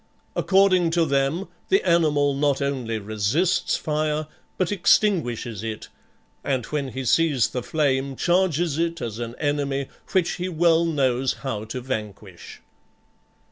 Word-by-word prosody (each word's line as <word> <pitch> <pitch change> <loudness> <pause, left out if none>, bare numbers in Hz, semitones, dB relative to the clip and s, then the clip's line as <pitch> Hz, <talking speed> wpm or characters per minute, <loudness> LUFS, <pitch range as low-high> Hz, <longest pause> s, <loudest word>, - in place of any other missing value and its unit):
According 190 -3 +3
to 165 - +4
them, 140 +6 0 0.2
the 190 0 +2
animal 150 -4 +3
not 140 0 +1
only 130 -5 -2
resists 110 - 0
fire, 155 0 -1 0.3
but 185 0 0
extinguishes 130 - +1
it, 110 -1 -5 0.5
and 130 -4 -1
when 145 -2 -3
he 130 0 -5
sees 145 -2 +3
the 125 - -3
flame 135 -1 0
charges 175 -2 +1
it 170 0 -1
as 115 -1 -5
an 120 0 -5
enemy 140 -2 -1 0.2
which 185 -3 +2
he 180 +1 -3
well 170 0 +3
knows 135 -5 +1
how 110 -5 -3
to 125 +3 -5
vanquish. 105 -7 -7
140 Hz, 135 wpm, -24 LUFS, 125-170 Hz, 0.5 s, to